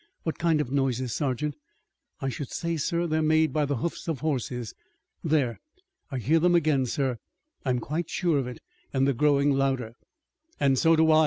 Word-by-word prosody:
"What 160 - -3
kind 165 -2 +3
of 130 -4 -2
noises, 130 -3 0
sergeant?" 145 0 -1 0.7
"I 135 - 0
should 135 +1 -5
say, 170 -1 -2
sir, 170 +3 0
that 175 - -1
they're 160 0 +2
made 155 0 +3
by 150 -1 +2
the 140 0 -1
hoofs 165 +9 -4
of 160 -5 -2
horses. 125 -6 -2 0.5
There, 145 -7 +1 0.5
I 135 - -3
hear 145 +7 +3
them 175 +1 +4
again, 150 -6 +3
sir. 130 -2 -1 0.5
I'm 130 -2 +2
quite 155 +7 -3
sure 170 -6 +1
of 130 - -2
it, 125 - -8 0.3
and 135 -1 +2
they're 140 - +3
growing 145 +2 +3
louder!" 135 -4 0 0.7
"And 135 -2 +3
so 165 -1 +5
do 160 0 +4
I!" 155 - +6
145 Hz, 190 wpm, -27 LUFS, 130-160 Hz, 0.7 s, I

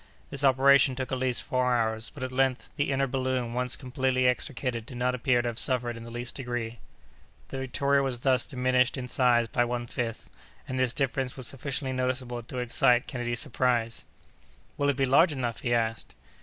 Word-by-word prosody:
This 140 0 -2
operation 135 0 +5
took 130 +1 -4
at 130 - -1
least 130 -2 0
four 125 -2 +1
hours, 110 -1 -1
but - - -8
at 130 - -3
length 130 0 0
the 145 - 0
inner 135 0 +1
balloon 130 -2 -2
once 125 +1 +2
completely 130 -1 -1
extricated 125 -2 -2
did 125 - -8
not 125 +1 +1
appear 125 0 +2
to 120 - -1
have 115 - -1
suffered 120 -2 +2
in 115 - -9
the - - -9
least 120 +1 -5
degree. 120 -3 -4 0.7
The 135 - -5
Victoria 140 +2 +1
was 130 -3 -1
thus 130 -2 +3
diminished 130 0 +1
in 125 -1 -5
size 120 -2 +3
by 120 - +1
one 120 0 -3
fifth, 115 -1 -5 0.4
and 130 0 -3
this 130 -2 +2
difference 135 0 -2
was 130 - +1
sufficiently 135 +1 0
noticeable 125 -1 -2
to 120 +2 -9
excite 125 +1 +3
Kennedy's 120 -3 -3
surprise. 120 -2 0 0.7
"Will 145 0 +1
it 140 - 0
be 135 - +2
large 150 +5 +4
enough?" 120 -4 -3
he 120 - -2
asked. 115 -2 -1
125 Hz, 195 wpm, -28 LUFS, 120-130 Hz, 0.7 s, operation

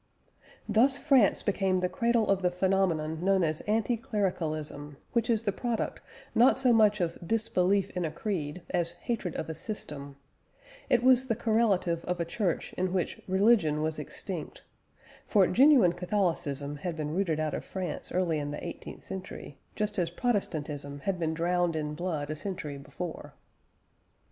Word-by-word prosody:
Thus 265 +5 +4
France 260 -8 +4
became 195 -2 +1
the 180 0 +1
cradle 230 +4 +1
of 195 -1 +2
the 180 - +3
phenomenon 180 -4 0
known 190 -1 +3
as 155 -1 -1
anti 225 +3 +1
clericalism, 155 -9 -3 0.2
which 235 0 +1
is 225 -1 +2
the 205 - +1
product 235 +3 -2 0.3
not 245 +3 +5
so 255 -2 +4
much 210 -2 +4
of 170 -2 -1
disbelief 200 -1 +1
in 180 - -2
a 160 - 0
creed 165 -2 -4
as 170 -1 0
of - - -20
hatred 215 -8 -3
of - - -3
a 160 - -4
system; 150 -6 -6 0.7
it 245 -3 +3
was 260 0 +5
the 230 - +1
correlative 205 -7 +1
of 180 0 -2
a 170 - 0
Church 185 0 -2
in 185 0 -1
which 185 -2 -2
religion 190 -6 +3
was 155 0 -2
extinct, - - -6 0.6
for 200 -4 +5
genuine 250 - +6
Catholicism 170 -7 -1
had 170 +3 -4
been 150 0 -3
rooted 170 -4 0
out 155 -1 -1
of - - -3
France 185 -2 -5
early 175 -4 +1
in 145 0 -3
the 145 - -5
eighteenth - - -8
century, 185 -6 -8 0.2
just 210 -2 -1
as 170 -2 +1
Protestantism 150 - -2
had 190 +1 -1
been 160 -1 -1
drowned 175 0 +1
in 150 -1 -2
blood 155 -3 -3
a - - -2
century 155 -5 -5
before. 165 +4 -7
180 Hz, 165 wpm, -29 LUFS, 160-210 Hz, 0.7 s, genuine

